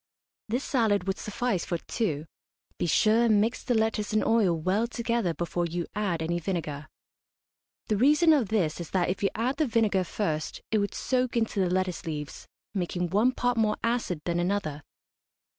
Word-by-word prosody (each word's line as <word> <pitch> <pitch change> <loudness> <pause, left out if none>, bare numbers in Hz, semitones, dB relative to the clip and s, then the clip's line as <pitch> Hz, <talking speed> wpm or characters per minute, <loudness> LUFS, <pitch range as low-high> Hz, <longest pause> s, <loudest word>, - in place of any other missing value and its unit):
This 245 +5 -1
salad 215 -7 +1
would 195 0 -2
suffice 215 -3 -1
for 175 - -2
two. 160 -5 -2 0.5
Be - - 0
sure 220 +8 +4
and 215 -3 +4
mix 225 +4 0
the 245 - 0
lettuce 220 -1 0
and 215 - +2
oil 215 -7 +3
well 195 +8 +1
together 235 -5 -1
before 175 0 -1
you 170 0 -3
add 190 -6 -1
any 170 +2 -1
vinegar. 155 -4 -3 1.0
The 215 - 0
reason 300 - +5
of 270 -8 +2
this 185 -8 0
is 170 - -7
that 180 -2 +1
if 185 - -2
you 200 - +2
add 250 +5 -1
the 310 - +2
vinegar 220 -5 +2
first 160 -4 -3
it 220 - +3
would 200 0 -2
soak 255 -1 0
into 225 -2 0
the 185 -2 +2
lettuce 185 -1 -1
leaves, 150 -2 -5 0.3
making 180 -2 -2
one 215 +6 +4
part 245 -1 0
more 215 -1 +2
acid 230 -9 -1
than 175 0 0
another. 175 -5 -1
205 Hz, 180 wpm, -28 LUFS, 175-230 Hz, 1.0 s, reason